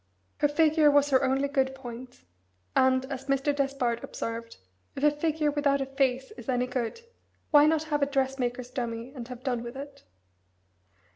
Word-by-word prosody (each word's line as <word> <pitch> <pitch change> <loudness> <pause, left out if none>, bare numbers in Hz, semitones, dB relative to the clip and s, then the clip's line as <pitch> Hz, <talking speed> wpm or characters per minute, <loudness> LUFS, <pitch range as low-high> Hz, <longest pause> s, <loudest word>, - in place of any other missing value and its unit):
Her 295 - +3
figure 305 +1 +4
was 285 0 +3
her 260 - +4
only 270 +2 +1
good 265 -2 0
point, 245 -1 -10 0.5
and, 260 0 +3
as 270 -1 -5
Mr. 275 +1 +1
Despard 270 -4 -1
observed, 230 0 -5 0.4
"If 275 - -5
a 295 - +6
figure 300 0 0
without 285 -1 +1
a 270 - -1
face 265 -1 0
is 240 +1 -9
any 250 -1 +1
good, 250 - -3 0.5
why 295 0 +7
not 315 0 +2
have 295 -2 -1
a 280 - +3
dressmaker's 260 -3 -1
dummy, 235 0 -4
and 245 -4 -7
have 250 -1 -9
done 250 -4 -1
with 240 +2 -7
it?" 280 0 -9
270 Hz, 170 wpm, -28 LUFS, 250-290 Hz, 0.5 s, why